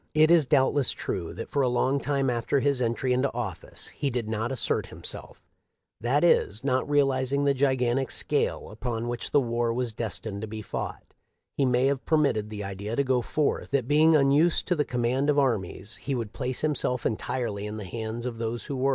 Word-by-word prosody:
It 155 +1 +6
is 165 -5 +5
doubtless 135 +1 +3
true 85 -4 -4
that 115 - -7
for 140 - +1
a 130 - +3
long 130 +3 +1
time 140 -1 0
after 120 +2 +1
his 140 -1 +1
entry 120 +2 0
into 130 +2 +1
office 105 -8 -5
he 140 - -2
did 120 -3 -2
not 110 +3 -2
assert 130 - -1
himself; - - -8 0.6
that 125 +8 +1
is, 115 -10 +3
not 130 0 0
realizing 140 -1 +2
the 140 - +4
gigantic 130 -1 +1
scale - - -1
upon 115 +1 -3
which 120 0 -4
the 145 - +4
war 120 -2 0
was 120 -1 -2
destined 110 -2 -4
to 110 - -4
be 110 0 -6
fought, - - -6 0.4
he 140 - +2
may 125 0 +3
have 135 -1 +1
permitted 140 -10 +1
the 105 -1 -5
idea 100 +3 -4
to 140 - +2
go 130 -2 +2
forth 150 +4 -1
that 135 -4 0
being 155 +3 +5
unused 145 +4 +3
to 180 - +3
the 150 -2 +1
com 125 -1 -2
mand 130 +5 +1
of 145 - +3
armies 110 -6 0
he 140 - -3
would 115 -4 -4
place 130 0 -3
himself 135 -5 -1
entirely 110 -2 -2
in 105 +1 -5
the 105 - -6
hands 110 +4 -5
of 120 -2 -4
those 115 +1 -3
who 140 - -5
were. 135 +2 +2
125 Hz, 205 wpm, -27 LUFS, 115-140 Hz, 0.6 s, It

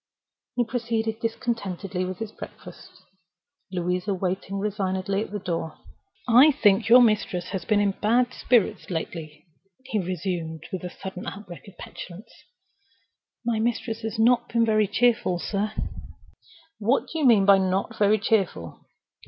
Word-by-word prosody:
He 245 - +2
proceeded 225 -2 -2
discontentedly 200 -5 -3
with 185 0 -5
his 220 +1 -5
breakfast. - - -12 0.7
Louisa 180 +2 -1
waited 190 +1 -3
resignedly 195 -1 -1
at - - -5
the 210 - -4
door. 165 -5 -4 0.5
"I 250 +6 +8
think 205 -3 +3
your 245 +1 +9
mistress 210 -6 +1
has 185 -4 -4
been 210 -1 +3
in 205 -1 +2
bad 240 +5 +1
spirits 240 -5 +1
lately," 160 -2 -5 0.4
he 215 - -1
resumed, 175 -3 -3
with 185 - -4
a 180 - -4
sudden 190 0 -8
outbreak 200 -2 -9
of 200 - -14
petulance. 185 +4 -10 1.1
"My 235 -2 0
mistress 230 0 -1
has 220 0 -4
not 240 +2 +3
been 230 -1 +2
very 215 -2 +3
cheerful, 230 -3 +2
sir." 205 +4 -2 1.1
"What 230 +6 +2
do 325 - -2
you 300 - +1
mean 215 -5 +6
by 200 -1 +7
not 190 +4 -1
very 210 +1 +4
cheerful? 195 - -1
205 Hz, 145 wpm, -25 LUFS, 185-225 Hz, 1.1 s, your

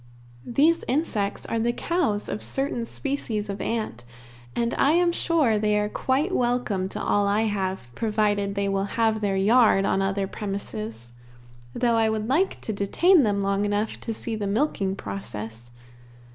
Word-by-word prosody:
These 305 +7 +3
insects 235 -8 -1
are 230 - -1
the 235 +1 +1
cows 265 -9 -1
of - - -3
a - - -8
certain 270 -4 -1
species 230 -8 -3
of 200 - -4
ant, 215 - -3 0.5
and 235 0 0
I 285 - +3
am 345 0 +3
sure 305 -11 +2
they 210 0 +2
are 210 0 0
quite 280 - 0
welcome 240 -6 0
to - - -5
all 205 0 +1
I 205 +2 +2
have, 190 - -2
provided 210 - 0
they 200 0 0
will 195 0 0
have 220 -1 +2
their 195 -2 0
yard 210 -1 +4
on 195 - +1
other 195 0 0
premises, 120 - -6 0.6
though 235 -2 +2
I 225 -1 +3
would 220 0 -2
like 325 +10 +1
to 220 - -3
detain 315 - +4
them 205 -4 +1
long 200 +1 +1
enough 205 +1 -1
to 230 - -5
see 225 +1 -4
the 210 -2 -3
milking 200 -4 0
process. 110 - -7
210 Hz, 170 wpm, -25 LUFS, 195-240 Hz, 0.6 s, yard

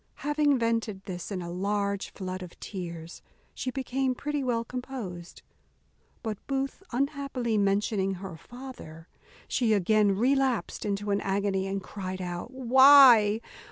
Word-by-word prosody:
Having 295 -1 +3
vented 230 -4 -1
this 180 0 -6
in 185 -3 -3
a 170 - -6
large 200 +2 -1
flood 185 -1 -6
of 180 -2 -10
tears, 170 -3 -7 0.3
she 255 - -4
became 260 0 -1
pretty 295 +1 -2
well 235 -2 0
composed; 230 -9 -7 0.8
but 220 -3 -3
Booth 275 +4 -2
unhappily 270 -3 -1
mentioning 200 -1 +1
her 190 -2 -8
father, 240 - -11 0.4
she 230 -4 +1
again 205 0 +3
relapsed 260 0 +1
into 205 0 -2
an 200 +1 +1
agony, 195 -1 0
and 195 0 -3
cried 185 -1 -6
out, 175 +3 -5
"Why? 260 -4 +7
210 Hz, 130 wpm, -28 LUFS, 190-255 Hz, 0.8 s, Why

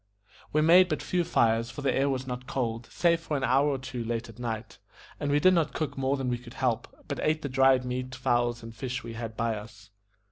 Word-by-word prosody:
We 155 - +3
made 180 +3 +7
but 155 - -2
few 180 -1 0
fires, 115 -5 +2
for 145 +3 -7
the 135 - +2
air 140 +1 +2
was 130 -1 -2
not 125 0 -6
cold, 115 -2 -2
save 170 -1 +2
for 155 -3 -2
an 135 - -3
hour 135 +3 +3
or 140 - 0
two 130 -2 -5
late 115 0 -3
at 115 +1 -13
night, 115 -2 -5 0.4
and 145 - -2
we 145 +1 +3
did 185 +5 +5
not 165 -4 +1
cook 155 - -2
more 135 +1 0
than 135 -1 -2
we 120 -1 -1
could 120 0 -13
help, 120 -3 0 0.2
but - - -4
ate 155 +1 +1
the 140 - -2
dried 130 -1 +4
meat, 130 +1 -4
fowls, 120 -1 0
and 115 0 -8
fish 130 +3 -4
we 115 - -7
had 115 -1 -6
by 115 -1 0
us. 105 0 -11
130 Hz, 245 wpm, -28 LUFS, 115-140 Hz, 0.4 s, made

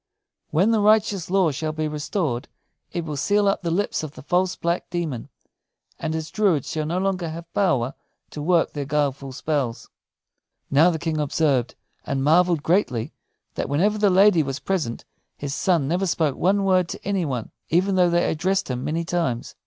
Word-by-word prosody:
When 185 +9 +3
the 225 - +3
righteous 210 -4 +3
law 185 -4 +3
shall 155 +3 -3
be 155 0 -2
restored, 150 -3 -2 0.4
it 170 -2 -3
will 150 -2 -4
seal 205 +8 +2
up 195 - +1
the 170 - -2
lips 190 +5 0
of 155 -2 -6
the - - -12
false 180 +4 +1
black 170 +1 -2
demon; 160 -9 -3 0.7
and 160 - -2
his 160 -1 -4
druids 190 - +1
shall 155 -1 -2
no 170 +3 -1
longer 185 -3 -1
have 165 +1 -9
power 135 -10 +1 0.4
to 150 - -6
work 170 +2 +2
their 145 -2 -3
guileful 140 -2 -1
spells." 140 -3 -3 0.8
Now 150 +5 +6
the 165 - -1
King 160 -1 -2
observed, 140 -4 +1 0.3
and 135 -1 -2
marveled 165 +1 +3
greatly, 155 - +1 0.4
that - - -3
whenever 200 +9 +1
the 205 -1 +4
lady 190 -2 +5
was 135 -2 -3
present 160 -11 -3 0.3
his 140 -1 -4
son 170 -4 +1
never 180 +5 0
spoke 160 -5 +1
one 195 +3 +2
word 185 -3 +2
to - - -7
any 195 -3 +1
one, 125 -7 -3 0.2
even 185 +4 +2
though 180 -2 +4
they 170 0 +2
addressed 180 -1 0
him 125 0 -3
many 165 +2 -2
times. 150 -9 -2
165 Hz, 185 wpm, -23 LUFS, 145-185 Hz, 0.8 s, Now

